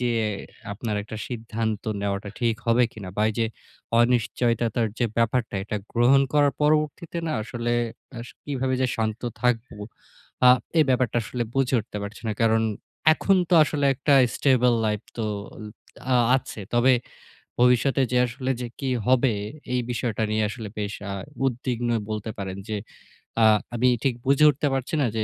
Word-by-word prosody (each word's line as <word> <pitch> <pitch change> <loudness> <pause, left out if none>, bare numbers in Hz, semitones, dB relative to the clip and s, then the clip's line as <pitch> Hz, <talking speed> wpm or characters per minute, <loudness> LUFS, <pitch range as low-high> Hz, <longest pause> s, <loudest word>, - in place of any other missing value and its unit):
যে 125 -1 +1 0.6
আপনার 105 0 -3
একটা 110 +1 -8
সিদ্ধান্ত 110 -2 -3 0.2
নেওয়াটা 100 0 -2
ঠিক 115 -2 +2
হবে 115 +1 +4
কিনা? 100 -4 -8
বা 105 - +1
এই - - -7
যে 115 - +2 0.5
অনিশ্চয়তার 120 -1 +1
যে 120 - +2
ব্যাপারটা, 115 -1 +1
এটা 105 - -3 0.2
গ্রহণ 125 +4 +5
করার 145 -1 +4
পরবর্তীতে 155 +3 +1
না 155 - -1
আসলে 120 +1 -3 0.5
আস 120 - -7 0.2
কিভাবে 130 -2 -1
যে - - +3
শান্ত 110 0 -2 0.2
থাকব? 125 -1 +1 0.8
আ - - +10 0.3
এই 155 - +6
ব্যাপারটা 125 -2 +1
আসলে 120 +2 -3
বুঝে 135 -1 +1
উঠতে 105 -1 -7
পারছি 100 +2 -8
না। 110 - 0
কারণ 115 0 +3 0.5
এখন 195 +2 +2
তো 180 - +5
আসলে 145 -2 -2
একটা 140 +3 +1 0.2
stable 125 -3 +3
life 105 +1 -2
তো 110 - -1 0.9
আ - - +6 0.2
আছে। 120 -4 -6
তবে 125 +2 +5 0.7
ভবিষ্যতে 125 +2 +4
যে 125 - +3
আসলে 130 +2 -4
যে 125 - -3
কি 135 -2 -1 0.2
হবে? 130 -1 +4 0.4
এই 125 - +2
বিষয়টা 115 -2 -2
নিয়ে 110 0 +1
আসলে 110 -1 -6
বেশ 100 -1 -3 0.2
আ - - -3 0.3
উদ্বিগ্নই 120 -2 -1
বলতে 110 +1 -3
পারেন। 95 -1 -4
যে 110 - -2 0.7
আ - - +7 0.3
আমি 125 +2 +2 0.2
ঠিক 135 - +2
বুঝে 140 +3 +5
উঠতে 145 +1 0
পারছি 135 +4 -2
না 125 - +2
যে, 110 - +1
120 Hz, 160 wpm, -25 LUFS, 110-130 Hz, 0.9 s, আ